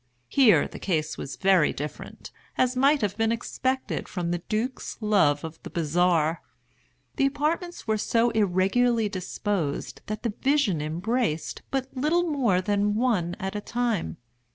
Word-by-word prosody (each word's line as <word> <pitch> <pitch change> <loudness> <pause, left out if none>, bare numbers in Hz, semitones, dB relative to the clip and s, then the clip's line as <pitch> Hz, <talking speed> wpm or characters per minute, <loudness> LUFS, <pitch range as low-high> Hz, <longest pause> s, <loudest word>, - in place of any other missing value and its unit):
Here 255 -7 +5
the - - -10
case 160 -5 -1
was 135 - -6
very 190 -5 +4
different; 150 +2 -7 0.3
as 255 0 +2
might 275 +3 +4
have 205 -2 -1
been 225 0 +2
expected 260 +3 -2
from 175 -3 -2
the 175 - -1
duke's 235 +4 -2
love 195 -10 +3
of 160 0 -8
the - - -8
bizarre. 165 0 +1 0.8
The 275 -2 +4
apartments 325 +5 -2
were 220 -1 +1
so 230 +2 +2
irregularly 215 +3 +2
disposed 185 -4 -3
that 215 0 -4
the 230 -3 -1
vision 265 - +2
embraced 165 +2 -2
but 265 0 -3
little 305 +7 +2
more 245 - +2
than 205 +1 +1
one 210 -8 +1
at 190 +2 -4
a 210 - -2
time. 225 - -2
210 Hz, 150 wpm, -26 LUFS, 175-250 Hz, 0.8 s, Here